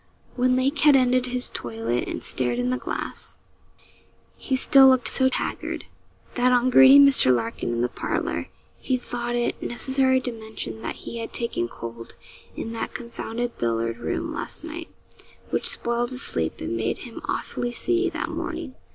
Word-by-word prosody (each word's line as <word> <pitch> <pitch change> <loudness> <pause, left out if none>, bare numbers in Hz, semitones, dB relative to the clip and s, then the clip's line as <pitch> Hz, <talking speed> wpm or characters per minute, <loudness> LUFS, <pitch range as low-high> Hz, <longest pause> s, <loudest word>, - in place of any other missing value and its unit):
When 255 0 +3
Lake 270 +3 +1
had 295 -1 +6
ended 255 -1 +3
his 250 0 -1
toilet 115 +1 -3
and - - -5
stared 125 -2 -1
in 125 0 0
the 125 - -1
glass, - - -5 1.0
he 265 - -2
still 270 +1 +7
looked 260 -2 +4
so 260 -1 +2
haggard, - - -3 0.5
that 250 0 +3
on 250 +1 +3
greeting 270 +2 +9
Mr. 270 - +6
Larkin 115 -1 -1
in 120 0 -1
the 120 - +2
parlour, - - -3 0.3
he 260 - 0
thought 240 -1 -4
it 240 0 -1
necessary 260 +1 +2
to 250 - -2
mention 220 - -7
that 115 - -4
he 235 - -5
had 225 - -6
taken 235 - -1
cold 115 0 -9 0.4
in 225 - -5
that 230 - -4
confounded 240 0 -5
billiard 115 0 -1
room 120 - -3
last - - -3
night, 330 +1 -7 0.6
which 470 - 0
spoiled 240 - 0
his 255 0 -4
sleep, 80 -1 -2
and 80 - -3
made 115 +1 -1
him 235 - -9
awfully 245 - -3
seedy 355 +8 0
that - - -4
morning. 330 -5 -5
240 Hz, 170 wpm, -24 LUFS, -, 1.0 s, greeting